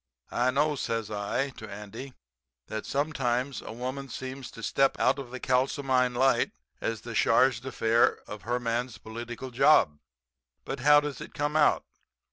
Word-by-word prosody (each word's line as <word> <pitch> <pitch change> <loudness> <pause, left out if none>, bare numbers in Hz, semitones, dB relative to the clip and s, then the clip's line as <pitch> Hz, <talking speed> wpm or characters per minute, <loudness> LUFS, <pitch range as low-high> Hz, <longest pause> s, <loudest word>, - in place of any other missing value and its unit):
I 125 +1 +2
know,' 150 +3 +2
says 115 -4 -2
I 105 +7 -1
to 110 - -8
Andy, 105 +6 -8 0.5
'that 110 0 -5
sometimes 135 -3 -1
a - - -8
woman 130 +4 -5
seems 130 +1 -6
to 115 - -11
step 135 +4 +2
out - - +3
into 135 -3 -7
the 130 +1 -7
kalsomine 130 -1 +1
light 135 +2 +3 0.3
as 115 -1 -2
the 120 - -7
charge 120 +1 +4
d'affaires 115 -3 +2
of 105 -1 -8
her 120 +3 -1
man's 120 +1 -2
political 120 +3 -7
job. 125 - +4 0.7
But - - -4
how 145 +3 +6
does 145 -3 -5
it - - -9
come 145 +1 -1
out? 155 -1 +4
125 Hz, 160 wpm, -28 LUFS, 115-135 Hz, 0.7 s, how